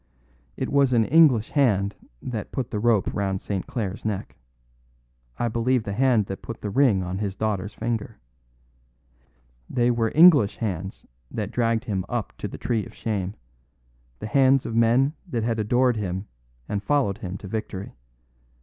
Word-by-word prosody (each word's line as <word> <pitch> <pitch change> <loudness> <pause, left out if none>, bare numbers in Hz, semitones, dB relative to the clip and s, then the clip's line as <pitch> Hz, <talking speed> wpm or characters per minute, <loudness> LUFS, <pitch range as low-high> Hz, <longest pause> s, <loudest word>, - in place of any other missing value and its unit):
"It - - -2
was 140 -2 +3
an 115 -2 +4
English 140 -7 +5
hand 105 -8 +2 0.3
that 115 -5 -5
put 130 -4 -3
the 105 - -2
rope 110 -2 +2
round 95 -2 -1
St. 95 -2 -4
Clare's 105 -4 -4
neck; 105 -3 -4 1.0
I 120 - 0
believe 115 +2 +1
the 100 - -4
hand 120 -2 +3
that 95 0 -6
put 115 - -7
the 105 - -4
ring 120 -7 +3
on 90 +2 -4
his 100 -2 -3
daughter's 105 -2 -2
finger. 115 -1 -3 1.5
They 120 0 +2
were 115 -2 0
English 150 - +7
hands 95 -4 -4 0.2
that - - -4
dragged 115 -1 +1
him 100 -6 -2
up 120 -3 -3
to - - -3
the - - -8
tree 115 -3 -1
of - - -12
shame; 100 -4 -3 0.8
the - - -7
hands 135 +3 +3
of - - -4
men 120 +5 +3
that 120 -9 -2
had 115 -1 -1
adored 120 +3 +2
him 95 -1 -3 0.4
and 100 - -2
followed 120 -5 +1
him 95 -4 -5
to 100 - -10
victory. 100 -1 -5
110 Hz, 165 wpm, -24 LUFS, 100-125 Hz, 1.5 s, English